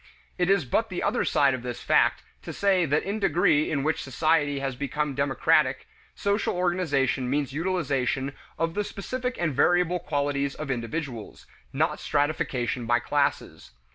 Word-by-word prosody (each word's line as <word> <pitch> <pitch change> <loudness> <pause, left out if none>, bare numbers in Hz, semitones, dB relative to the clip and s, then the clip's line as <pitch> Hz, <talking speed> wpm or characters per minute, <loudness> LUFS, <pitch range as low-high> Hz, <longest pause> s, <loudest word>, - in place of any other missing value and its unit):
It 180 0 +2
is 195 -6 +3
but 220 - 0
the 180 - -3
other 235 +4 +1
side 140 -2 +3
of 130 - -4
this 120 -1 -5
fact - - +3 0.2
to - - -7
say 190 -4 +2
that 150 +2 +1
in 200 +2 -2
the 200 - +3
degree 165 -4 +3
in 140 -3 -1
which 155 +2 0
society 145 +1 +1
has 135 -1 -3
become 145 +2 -2
democratic, 140 0 +1 0.3
social 200 -1 0
organization 155 -8 0
means 140 0 -1
utilization 140 -5 -1 0.2
of 165 0 -1
the 210 - -1
specific 250 +6 -4
and 165 -4 0
variable 175 +4 +2
qualities 140 -2 -1
of 155 -3 -4
individuals, 125 -1 -5 0.3
not - - 0
stratification 130 -5 -1
by 120 +1 +4
classes. 145 +4 -2
145 Hz, 160 wpm, -26 LUFS, 135-180 Hz, 0.3 s, by